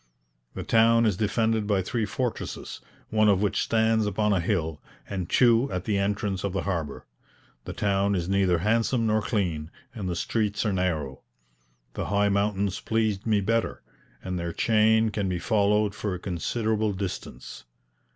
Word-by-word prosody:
The -, -, -4 dB
town 115 Hz, +1 st, +4 dB
is 105 Hz, -4 st, +2 dB
defended 110 Hz, +1 st, 0 dB
by 100 Hz, -3 st, +1 dB
three 110 Hz, +2 st, -2 dB
fortresses, 120 Hz, +4 st, -4 dB, 0.3 s
one 110 Hz, -1 st, +4 dB
of 100 Hz, -2 st, +4 dB
which 100 Hz, -1 st, +1 dB
stands 110 Hz, -1 st, +2 dB
upon 105 Hz, +1 st, +1 dB
a 95 Hz, -, +2 dB
hill, 85 Hz, -4 st, -1 dB, 0.3 s
and 95 Hz, -4 st, -4 dB
two 120 Hz, +1 st, +4 dB
at 90 Hz, -1 st, -3 dB
the 100 Hz, -2 st, 0 dB
entrance 100 Hz, -1 st, -1 dB
of 100 Hz, -2 st, -2 dB
the 95 Hz, -, -1 dB
harbour. 85 Hz, -7 st, -3 dB, 0.6 s
The -, -, -5 dB
town 100 Hz, 0 st, +1 dB
is 85 Hz, -2 st, -2 dB
neither 95 Hz, -2 st, +2 dB
handsome 115 Hz, +5 st, +1 dB
nor 110 Hz, 0 st, +2 dB
clean, 85 Hz, -9 st, -2 dB, 0.2 s
and 100 Hz, -5 st, -4 dB
the 90 Hz, -, -2 dB
streets 105 Hz, +4 st, -1 dB
are 105 Hz, -, +1 dB
narrow. 80 Hz, -8 st, -2 dB, 0.7 s
The -, -, -4 dB
high 100 Hz, 0 st, +2 dB
mountains 100 Hz, -1 st, 0 dB
pleased 110 Hz, -2 st, -1 dB
me 105 Hz, -2 st, +3 dB
better; 115 Hz, +3 st, -1 dB, 0.4 s
and 90 Hz, -1 st, -3 dB
their 85 Hz, 0 st, -3 dB
chain 110 Hz, +1 st, +3 dB
can 100 Hz, -3 st, -2 dB
be 90 Hz, -, -1 dB
followed 105 Hz, 0 st, +2 dB
for 105 Hz, -2 st, -3 dB
a -, -, -7 dB
considerable 105 Hz, +4 st, -1 dB
distance. 95 Hz, -9 st, -6 dB
100 Hz, 165 wpm, -26 LUFS, 95-110 Hz, 0.7 s, town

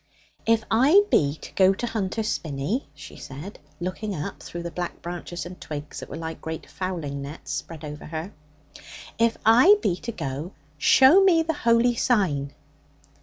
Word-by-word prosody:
'If 225 Hz, -1 st, +3 dB
I 285 Hz, -, +6 dB
be 140 Hz, -1 st, +3 dB
to -, -, -12 dB
go 190 Hz, 0 st, +4 dB
to 240 Hz, -, -3 dB
Hunter's 220 Hz, -1 st, -2 dB
Spinney,' 160 Hz, -, -2 dB
she 145 Hz, 0 st, -11 dB
said, 145 Hz, +10 st, -9 dB, 0.2 s
looking 185 Hz, +3 st, -4 dB
up 180 Hz, +6 st, -5 dB
through 170 Hz, 0 st, -7 dB
the 170 Hz, -, -5 dB
black 175 Hz, 0 st, -5 dB
branches 175 Hz, 0 st, -5 dB
and 180 Hz, +1 st, -10 dB
twigs 145 Hz, -1 st, -6 dB
that -, -, -9 dB
were -, -, -6 dB
like 160 Hz, 0 st, -6 dB
great 160 Hz, 0 st, -6 dB
fowling 165 Hz, -7 st, -4 dB
nets 140 Hz, +3 st, -8 dB
spread 160 Hz, -2 st, -5 dB
over 150 Hz, 0 st, -8 dB
her 160 Hz, +5 st, -6 dB, 0.9 s
'if 230 Hz, 0 st, +3 dB
I 250 Hz, -, +7 dB
be 180 Hz, -, 0 dB
to 235 Hz, -, -5 dB
go, 150 Hz, -, -5 dB, 0.3 s
show 270 Hz, -, +7 dB
me 340 Hz, -4 st, +5 dB
the 320 Hz, 0 st, -1 dB
Holy 235 Hz, -2 st, +3 dB
Sign.' 185 Hz, -, +1 dB
180 Hz, 170 wpm, -25 LUFS, 155-230 Hz, 0.9 s, I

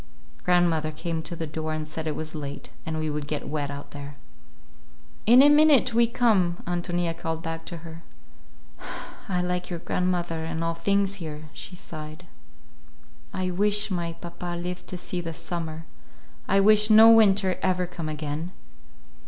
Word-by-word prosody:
Grandmother 170 Hz, -3 st, +3 dB
came 165 Hz, +1 st, -3 dB
to 170 Hz, -, -6 dB
the 165 Hz, -, -3 dB
door 155 Hz, 0 st, -4 dB
and 155 Hz, -1 st, -4 dB
said 160 Hz, +1 st, -4 dB
it 150 Hz, -, -1 dB
was 155 Hz, +1 st, -5 dB
late, 145 Hz, -3 st, -6 dB, 0.2 s
and 160 Hz, 0 st, -2 dB
we 155 Hz, 0 st, -1 dB
would 150 Hz, -1 st, -3 dB
get 150 Hz, -1 st, -3 dB
wet 145 Hz, -1 st, -2 dB
out 140 Hz, 0 st, -7 dB
there. 145 Hz, 0 st, -8 dB, 1.1 s
"In 245 Hz, +4 st, +9 dB
a -, -, +8 dB
minute 295 Hz, -4 st, +6 dB
we 235 Hz, 0 st, +5 dB
come," 215 Hz, -8 st, +2 dB
Ántonia 175 Hz, -1 st, -1 dB
called 165 Hz, 0 st, -4 dB
back 165 Hz, -1 st, -5 dB
to 170 Hz, -, -6 dB
her. 165 Hz, 0 st, -9 dB, 1.3 s
"I 180 Hz, -2 st, +1 dB
like 180 Hz, 0 st, -2 dB
your 175 Hz, -, -3 dB
grandmother, 175 Hz, -1 st, -1 dB
and 160 Hz, 0 st, -3 dB
all 165 Hz, 0 st, 0 dB
things 200 Hz, +3 st, +1 dB
here," 155 Hz, -1 st, -6 dB
she 185 Hz, -, -9 dB
sighed. 155 Hz, 0 st, -9 dB, 1.1 s
"I 185 Hz, -1 st, -2 dB
wish 205 Hz, +3 st, +1 dB
my 170 Hz, -2 st, -2 dB
papa 175 Hz, +1 st, -6 dB
live 180 Hz, +1 st, -5 dB
to 180 Hz, -, -5 dB
see 180 Hz, 0 st, -3 dB
this 165 Hz, -2 st, -6 dB
summer. 165 Hz, -2 st, -5 dB, 0.6 s
I 195 Hz, +1 st, +4 dB
wish 210 Hz, +1 st, +5 dB
no 220 Hz, +1 st, +9 dB
winter 200 Hz, -4 st, +5 dB
ever 185 Hz, -1 st, +1 dB
come 170 Hz, -3 st, -6 dB
again." 155 Hz, +3 st, -4 dB
175 Hz, 165 wpm, -26 LUFS, 160-185 Hz, 1.3 s, In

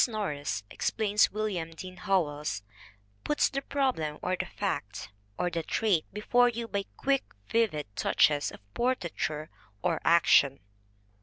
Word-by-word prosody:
NORRIS," 145 Hz, -, -3 dB
explains 210 Hz, -1 st, +2 dB
William 205 Hz, -6 st, -2 dB
Dean 185 Hz, +2 st, -8 dB
Howells, 150 Hz, -, 0 dB, 0.6 s
"puts 295 Hz, -, +2 dB
the 275 Hz, -, -2 dB
problem, 260 Hz, -, -1 dB
or 185 Hz, +1 st, +1 dB
the 180 Hz, 0 st, -3 dB
fact, 100 Hz, -, -4 dB, 0.3 s
or 175 Hz, -, 0 dB
the 165 Hz, -1 st, -1 dB
trait 185 Hz, -1 st, +1 dB
before 245 Hz, +4 st, +3 dB
you 235 Hz, -1 st, -4 dB
by 200 Hz, -2 st, -2 dB
quick, 275 Hz, 0 st, +2 dB, 0.3 s
vivid 215 Hz, -11 st, +2 dB
touches 145 Hz, -1 st, +3 dB
of -, -, -12 dB
portraiture 170 Hz, -10 st, -1 dB, 0.3 s
or -, -, +1 dB
action. 145 Hz, -5 st, +5 dB
185 Hz, 130 wpm, -29 LUFS, 150-225 Hz, 0.6 s, action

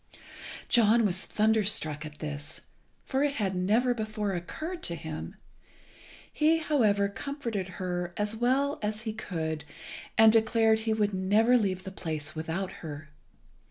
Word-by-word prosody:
John 230 Hz, -1 st, +5 dB
was 190 Hz, -2 st, 0 dB
thunderstruck 205 Hz, -9 st, +2 dB
at 150 Hz, 0 st, -13 dB
this, 150 Hz, 0 st, -6 dB, 0.4 s
for 270 Hz, +1 st, 0 dB
it 285 Hz, -1 st, 0 dB
had 195 Hz, -3 st, -1 dB
never 220 Hz, +7 st, +2 dB
before 215 Hz, -3 st, -3 dB
occurred 315 Hz, -, -5 dB
to 170 Hz, -, -1 dB
him. 155 Hz, 0 st, -6 dB, 1.0 s
He, 315 Hz, +2 st, +3 dB
however, 220 Hz, -11 st, +2 dB
comforted 230 Hz, -3 st, -4 dB
her 180 Hz, -2 st, -3 dB
as 210 Hz, +1 st, -1 dB
well 265 Hz, +5 st, +1 dB
as 210 Hz, 0 st, -2 dB
he 220 Hz, -2 st, -4 dB
could, 160 Hz, -7 st, -4 dB, 0.5 s
and 220 Hz, 0 st, +8 dB
declared 220 Hz, 0 st, +4 dB
he 220 Hz, 0 st, 0 dB
would 210 Hz, -2 st, +1 dB
never 210 Hz, +6 st, +3 dB
leave 190 Hz, -5 st, +1 dB
the 190 Hz, -, -7 dB
place 155 Hz, -5 st, -4 dB
without 165 Hz, +4 st, -3 dB
her. 155 Hz, -1 st, -8 dB
210 Hz, 140 wpm, -29 LUFS, 175-225 Hz, 1.0 s, and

